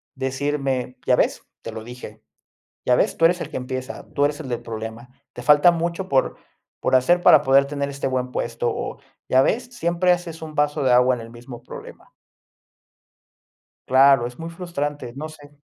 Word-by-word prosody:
decirme: 135 -1 -2
"¿Ya - - +5
ves? - - 0 0.2
Te - - -6
lo 110 - -7
dije. 120 -2 -10 0.7
¿Ya 125 - +5
ves? - - +1
Tú 165 - +5
eres 175 +1 +1
el - - -5
que - - -4
empieza. 130 0 -6
Tú 145 - +2
eres 145 +2 -1
el 140 - -7
del 120 -1 -3
problema. 115 +1 -7 0.2
Te 125 - -7
falta 150 +6 +6
mucho 170 +2 -3
por 135 -1 +1 0.4
por - - +1
hacer, 175 +8 +3
para - - +7
poder 135 +1 +4
tener 140 0 -3
este 140 0 -4
buen 130 -1 -1
puesto", 120 0 -2
o: - - -4 0.3
"¿ya 130 +1 +5
ves? 245 - 0
Siempre 180 -3 +2
haces 170 -2 -4
un 155 -1 -8
vaso 150 0 0
de 130 -2 +3
agua 125 +1 +5
en 120 - -7
el 115 - -9
mismo 120 0 -11
problema". - - -11 1.8
Claro, 135 -1 +5
es 125 0 -9
muy 165 0 -6
frustrante, 145 -7 -4
no 155 +3 -5
sé. 145 -2 -14
135 Hz, 190 wpm, -22 LUFS, 125-155 Hz, 1.8 s, para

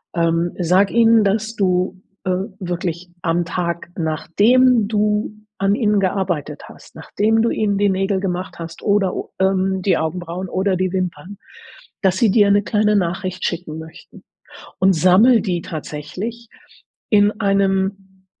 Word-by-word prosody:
Ähm, 170 0 0
sag 185 +3 +3
ihnen, 230 -2 +5
dass 220 +3 -1
du, 185 -1 0 0.2
äh 185 - -1 0.3
wirklich 175 -1 -4
am 170 +1 0
Tag, 170 0 -3
nachdem 210 - +2
du 210 0 0 0.2
an 195 +1 +1
ihnen 210 -3 +1
gearbeitet 185 -5 -2
hast, - - -16
nachdem 220 +2 0
du 230 - +2
ihnen 205 -2 0
die 205 0 +2
Nägel 195 0 0
gemacht 185 -2 -4
hast 165 0 -8
oder, 200 -3 +1 0.3
ähm, 190 0 +1
die 185 -2 +2
Augenbrauen 175 +3 -4
oder 190 0 0
die 185 0 -1
Wimpern, 185 +1 -4 0.6
dass 190 -2 +2
sie 225 -1 +3
dir 205 -2 +4
'ne 205 +1 +3
kleine 210 0 +1
Nachricht 185 0 -2
schicken 160 -2 -4
möchten. 160 0 -13 0.6
Und 190 0 +4
sammle 190 +9 +5
die 175 -4 -2
tatsächlich 180 +10 -7 0.6
in 205 0 +4
einem, 195 -1 -1
190 Hz, 140 wpm, -19 LUFS, 175-205 Hz, 0.6 s, ihnen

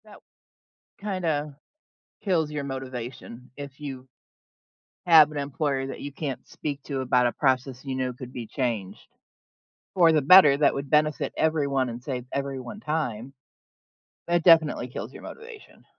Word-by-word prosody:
That - - -15 0.8
kinda 160 -8 -2 0.6
kills 165 -7 0
your 150 -1 -3
motivation 130 -2 -7
if 140 -1 -9
you 135 -3 -7 1.0
have 160 -3 +7
an 150 - -6
employer 140 -1 -2
that 135 - -7
you 145 - -6
can't 140 -2 -5
speak 145 -2 -6
to 140 -3 -4
about 125 -1 +2
a - - 0
process 130 -1 -1
you 135 -1 -3
know 130 -1 -1
could 125 0 -10
be 120 -2 -6
changed, 115 -6 -4 0.9
for 170 -3 +5
the 155 -1 +3
better, 150 -2 +8
that 145 0 +3
would 140 0 -5
benefit 150 -1 +2
everyone, 140 -4 +1
and 120 +1 -7
save 125 -2 -4
everyone 140 - -4
time. 135 - -3 0.9
That 175 0 +1
definitely 160 -7 +4
kills 125 - -7
your - - -12
motivation. 455 -2 -12
140 Hz, 145 wpm, -26 LUFS, 130-155 Hz, 1.0 s, better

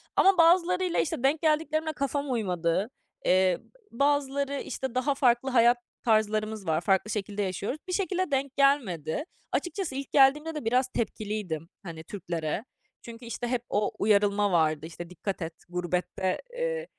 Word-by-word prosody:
ama 390 -2 +5
bazılarıyla, 360 +1 +4
işte, 265 -4 -1
denk 290 +3 +2
geldiklerimle 315 0 +1
kafam 280 0 -2
uymadı. 185 -2 0 0.4
Iıı, 185 -1 +3 0.3
bazıları, 280 +1 0
işte, 260 -2 -5
daha 275 +2 +1
farklı 250 0 +3
hayat 240 -1 +5 0.3
tarzlarımız 215 -3 +1
var, 160 +1 +1
farklı 195 +3 +1
şekilde 205 0 -3
yaşıyoruz. 200 - -3
Bir 365 - -3
şekilde 370 -4 -1
denk 275 0 -1
gelmedi. 245 - +1 0.3
Açıkçası 350 -6 -2
ilk 275 -1 -5
geldiğimde 295 +4 +4
de 295 -7 -5
biraz 250 +3 +2
tepkiliydim, 210 -9 -3
hani, 165 -3 -8
Türklere. 170 +2 -4 0.4
Çünkü 235 +1 -10
işte 235 +1 -4
hep 245 -1 -1
o 205 0 +1
uyarılma 205 -1 +3
vardı: 155 -2 +2
"İşte 170 +1 -8
dikkat 190 +2 -5
et, 165 0 -4 0.2
gurbette, 180 +1 -2 0.2
ııı, - - -1
235 Hz, 145 wpm, -28 LUFS, 190-285 Hz, 0.4 s, ama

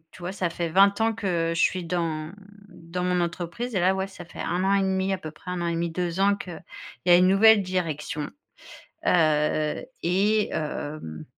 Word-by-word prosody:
Tu 180 - -14
vois, 180 +2 -4
ça 185 -3 -2
fait 170 0 -3
20 195 +5 +4
ans 225 0 +3
que 175 -6 -1
je 165 - -1
suis 185 -1 +1
dans 165 -2 -2 0.4
dans 170 -1 -6
mon 180 0 +1
entreprise 175 +8 -3
et 185 - +1
là, 185 +2 +3
ouais, 190 0 -2
ça 180 -2 -11
fait 165 - -11
1 180 +2 -1
an 195 - +3
et 195 - +3
1/2 190 0 0
à 190 - -1
peu 155 -3 -7
près, 180 +4 -10
1 180 - -3
an 170 - -1
et - - 0
1/2, 170 0 -1
2 175 +1 -3
ans 200 +1 +4
qu'il 175 -5 -8 0.4
y - - +4
a 175 - +9
une 180 +1 +5
nouvelle 205 +2 +6
direction. 155 -5 -3 0.8
Heu 155 -2 +2 0.2
et 205 +5 +2
hem, 145 - -5
180 Hz, 210 wpm, -25 LUFS, 165-190 Hz, 0.8 s, a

